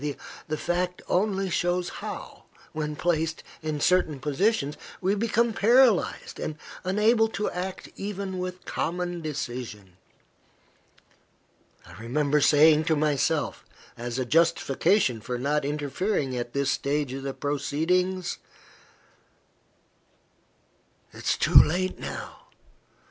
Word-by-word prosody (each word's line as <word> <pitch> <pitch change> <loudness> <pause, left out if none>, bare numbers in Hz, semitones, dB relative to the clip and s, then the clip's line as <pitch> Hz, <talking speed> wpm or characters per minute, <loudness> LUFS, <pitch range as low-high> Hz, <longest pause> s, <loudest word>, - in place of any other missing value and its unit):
The 155 - -2
fact 180 +2 -2
only 195 -1 +1
shows 175 0 0
how, - - -7 0.3
when 150 -1 -3
placed 160 0 -1 0.2
in 155 -2 -3
certain 160 -3 +2
positions, 150 - 0 0.2
we 190 +1 +1
become 230 +2 +1
paralyzed, 235 0 +3
and 155 - -4 0.3
unable 215 +4 +3
to 210 -1 -3
act 185 +1 -5
even 195 -2 -4
with 180 0 -5
common 175 0 -2
decision. 120 - -6 1.9
I - - -14
remember 145 +5 +1
saying 155 +2 +6
to 160 - +2
myself, 150 +1 0 0.3
as 120 +1 -5
a 130 - -1
justification 165 - +2
for 125 +2 -4
not 145 +4 0
interfering 145 +1 -1
at 120 -1 -4
this 140 0 +1
stage 140 -1 -1
of 135 - -5
the 135 0 -4
proceedings 175 +6 -1 2.7
"It - - -11
is - - +2
too - - 0
late 185 +4 -1
now. - - -7
160 Hz, 110 wpm, -26 LUFS, 145-185 Hz, 2.7 s, saying